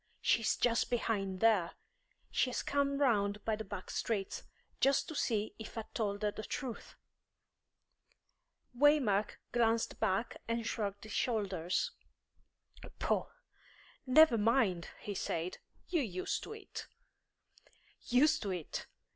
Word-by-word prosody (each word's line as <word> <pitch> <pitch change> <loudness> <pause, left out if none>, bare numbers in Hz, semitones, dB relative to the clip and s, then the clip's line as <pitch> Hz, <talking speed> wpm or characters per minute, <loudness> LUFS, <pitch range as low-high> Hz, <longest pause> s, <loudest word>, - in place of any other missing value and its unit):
She - - +3
is 220 - +1
just 235 -1 +2
behind 200 -6 -1
there. 210 -7 +4 0.6
She 255 - +2
has 250 - -2
come 280 0 +1
round 210 -7 +2
by 220 - +1
the 220 - -5
back 195 -2 -7
streets, 200 -4 -2 0.4
just 275 0 +3
to - - -5
see 220 -7 0
if 220 - -8
I'd 220 - -6
told 205 -2 -1
her 210 - +2
the 215 - -6
truth." 245 +2 -5 1.8
Waymark 245 -7 +3
glanced 230 -1 +1
back 220 +1 0
and 230 0 -1
shrugged 205 -3 -2
his 215 - -8
shoulders. 195 -7 0 1.1
"Pooh! - - 0 0.8
Never 255 -3 +7
mind," 205 -6 +2
he 205 - -4
said. 175 -1 -3 0.3
"You're 340 -4 +2
used 185 -7 -2
to - - -7
it." 430 -3 -8 1.2
"Used 300 +6 +4
to 205 - -3
it! 180 -5 -4
220 Hz, 130 wpm, -34 LUFS, 200-245 Hz, 1.8 s, Never